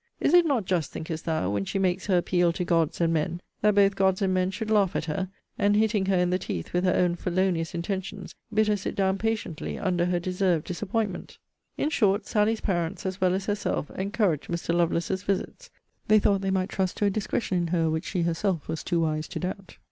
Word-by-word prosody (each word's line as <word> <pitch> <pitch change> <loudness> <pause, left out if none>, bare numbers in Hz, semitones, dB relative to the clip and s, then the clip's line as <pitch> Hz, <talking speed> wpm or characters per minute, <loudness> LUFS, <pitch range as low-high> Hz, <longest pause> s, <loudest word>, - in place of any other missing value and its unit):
Is 290 - +2
it 350 -1 +6
not 255 -9 +1
just, 175 -5 0
thinkest 160 0 -5
thou, 160 - 0
when 100 -1 0
she 145 - -3
makes 185 0 0
her 190 -3 +3
appeal 175 0 +2
to 180 - -2
gods 165 -2 +1
and 165 -1 +2
men, 165 +2 -1 0.2
that 210 -1 +3
both 200 -1 +4
gods 190 -1 +2
and 190 -1 +2
men 185 0 +1
should 215 +3 -4
laugh 200 -4 +3
at - - -1
her, 185 +4 -2 0.3
and 205 0 +3
hitting 210 -2 +2
her 195 -1 +3
in 180 0 +2
the 185 - +1
teeth 85 - -5
with 180 +1 +1
her 180 - +3
own 180 -1 +3
felonious 175 -2 -1
intentions, 190 +2 -4 0.2
bid 215 0 +2
her 210 - +3
sit 200 - -4
down 195 0 +1
patiently 220 -7 -2
under 180 -3 0
her 180 -1 +1
deserved 180 -2 0
disappointment?' 195 +1 -3 0.4
In 300 - 0
short, 205 -6 +2
Sally's 215 +1 +1
parents, 175 +1 -2
as 190 0 -3
well 185 0 +3
as 195 0 -3
herself, 205 -7 -2
encouraged 195 -5 0
Mr. 170 0 -1
Lovelace's 175 +2 +1
visits. 200 - -3 0.4
They 215 - +6
thought 200 -2 +2
they 195 - -1
might 190 0 0
trust 190 -2 -1
to 205 - +1
a 200 - +3
discretion 200 -2 -1
in 170 - -1
her 165 -1 +1
which 160 0 -1
she 180 -3 -1
herself 170 -1 -1
was 160 -1 -4
too 170 -2 0
wise 155 -1 -1
to - - -5
doubt. 185 +1 -6
185 Hz, 225 wpm, -26 LUFS, 170-200 Hz, 0.4 s, it